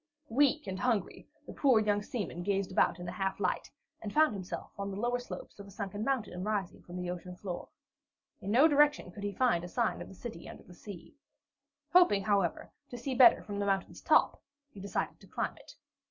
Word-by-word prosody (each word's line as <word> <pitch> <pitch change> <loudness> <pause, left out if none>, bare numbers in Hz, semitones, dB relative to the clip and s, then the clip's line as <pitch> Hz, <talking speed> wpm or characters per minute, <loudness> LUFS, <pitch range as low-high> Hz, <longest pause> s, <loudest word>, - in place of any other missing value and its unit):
Weak 285 +3 +3
and 190 -1 -4
hungry, 230 -7 -1 0.2
the - - -9
poor 260 -6 +4
young 205 -1 +1
seaman 205 -5 -4
gazed 195 0 -1
about 185 - +3
in 175 - -7
the 175 - -4
half 195 +1 -2
gloom, 185 -3 +1 0.4
and 210 - -5
found 310 +1 +4
himself 185 -3 -6
on 200 0 -2
the 195 0 -5
lower 240 +2 0
slopes 245 - -9
of 200 - -9
a - - -12
sunken 200 +1 -5
mountain 225 -8 -1
rising 205 -3 -2
from 175 +1 -9
the 180 -1 -3
ocean 180 0 -7
floor. 180 -1 -6 0.7
In 195 - -5
no 255 +9 +6
direction 295 - +3
could 200 - -10
he 205 - -1
find 220 -7 +2
a - - -5
sign 235 +5 -1
of - - -7
the 195 - -12
City 220 -5 -8
under - - -11
the 180 - -15
Sea. 175 -2 -11 0.8
Hoping, 280 - +6
however, 200 -4 0 0.2
to 245 - -7
see 260 +3 -3
better 250 -2 +7
from 205 -1 -5
the 200 - -1
mountain's 195 -1 -1
top, - - +3 0.3
he 200 - -12
decided 200 +1 -3
to - - -17
climb - - -3
it. - - -15
205 Hz, 210 wpm, -31 LUFS, 185-240 Hz, 0.8 s, better